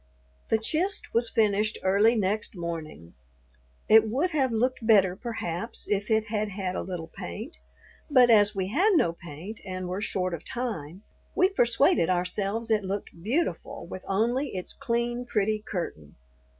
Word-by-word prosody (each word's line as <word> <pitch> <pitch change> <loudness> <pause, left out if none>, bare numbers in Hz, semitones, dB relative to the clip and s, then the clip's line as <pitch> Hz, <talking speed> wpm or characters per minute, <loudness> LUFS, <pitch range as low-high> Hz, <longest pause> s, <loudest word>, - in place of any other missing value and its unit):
The 225 - +4
"chist" 330 - -1
was 230 0 +2
finished 210 -1 +2
early 205 +5 +4
next 210 0 0
morning. 160 - -6 0.7
It 220 0 +6
would 290 +11 0
have 270 -5 +1
looked 235 +1 0
better, 195 -5 +5
perhaps, 225 -2 -5
if 205 +1 -1
it 220 -1 +2
had 215 -1 -2
had 190 -2 -3
a - - -2
little 175 -3 -6
paint, 85 -6 -7 0.5
but 250 -4 +6
as 205 -1 +5
we 190 -1 -2
had 370 - +3
no 170 - +3
paint 170 +6 -9
and 185 -1 -5
were 185 +3 -3
short 185 -3 -1
of 170 - -5
time, 205 - -5 0.3
we 370 - +4
persuaded 275 - +3
ourselves 195 +5 -1
it 215 -2 +2
looked 195 +1 -4
beautiful 265 - -2
with 185 - -8
only 235 +6 0
its 180 - -3
clean, 240 +1 -1
pretty 215 -2 0
curtain. 170 - -6
210 Hz, 155 wpm, -27 LUFS, 185-235 Hz, 0.7 s, It